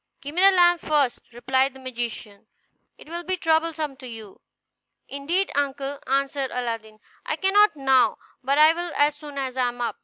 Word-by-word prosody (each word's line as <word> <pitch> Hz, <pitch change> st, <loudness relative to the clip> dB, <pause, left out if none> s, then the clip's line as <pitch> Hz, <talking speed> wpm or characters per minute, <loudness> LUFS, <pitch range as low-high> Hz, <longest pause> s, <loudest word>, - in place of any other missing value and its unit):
"Give 285 Hz, +1 st, -8 dB
me 355 Hz, -, 0 dB
the 390 Hz, -, +8 dB
lamp 350 Hz, -2 st, +4 dB
first," 285 Hz, -5 st, +1 dB
replied 260 Hz, +3 st, 0 dB
the -, -, -12 dB
magician; 235 Hz, -5 st, -6 dB, 0.5 s
"it -, -, -15 dB
will 340 Hz, +2 st, -5 dB
be 370 Hz, +1 st, -2 dB
troublesome 320 Hz, -3 st, 0 dB
to 260 Hz, -2 st, -10 dB
you." 220 Hz, -4 st, -11 dB, 0.7 s
"Indeed, 335 Hz, +8 st, -2 dB
uncle," 280 Hz, 0 st, -2 dB
answered 275 Hz, 0 st, 0 dB
Aladdin, 230 Hz, -3 st, -5 dB, 0.3 s
"I -, -, -2 dB
cannot 390 Hz, +2 st, +3 dB
now, 270 Hz, -2 st, +3 dB, 0.2 s
but 275 Hz, +2 st, 0 dB
I 310 Hz, +1 st, +7 dB
will 345 Hz, 0 st, -5 dB
as 290 Hz, 0 st, +3 dB
soon 295 Hz, -1 st, -11 dB
as 260 Hz, -2 st, -3 dB
I 250 Hz, -1 st, +2 dB
am 245 Hz, 0 st, -6 dB
up." 240 Hz, -, -3 dB
280 Hz, 180 wpm, -24 LUFS, 255-320 Hz, 0.7 s, the